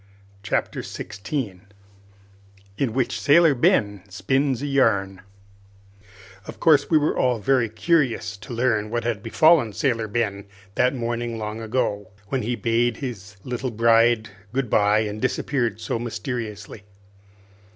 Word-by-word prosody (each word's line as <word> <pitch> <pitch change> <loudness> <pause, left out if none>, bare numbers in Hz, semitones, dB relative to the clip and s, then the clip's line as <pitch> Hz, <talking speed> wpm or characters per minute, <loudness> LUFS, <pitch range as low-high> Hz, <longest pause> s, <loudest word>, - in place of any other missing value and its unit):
Chapter - - -2
Sixteen 100 -3 -6 1.1
In 130 +1 -1
Which 130 0 -1
Sailor 155 +1 +5
Ben 105 -5 +2
Spins 130 +7 0
a - - -1
Yarn 100 -9 +1 1.3
Of - - -9
course 150 -4 +4
we 160 - +5
were 150 0 +1
all 125 -2 +1
very 115 +1 +1
curious 115 -3 0
to 110 +6 -12
learn 115 -3 0
what 120 0 -2
had 115 -4 -2
befallen 130 +1 +4
Sailor 115 0 0
Ben 100 -2 -2 0.3
that 125 +5 +2
morning 120 -1 -3
long 110 +1 -5
ago, 105 -3 -2 0.2
when 135 - -1
he 120 +2 -2
bade 115 +2 0
his 105 -7 -7
little 125 +1 -3
bride 115 0 +3 0.2
goodby 110 -5 +2
and 105 +1 -6
disappeared 125 -2 -1
so 115 - -3
mysteriously. 110 -3 -5
115 Hz, 130 wpm, -23 LUFS, 105-130 Hz, 1.3 s, Sailor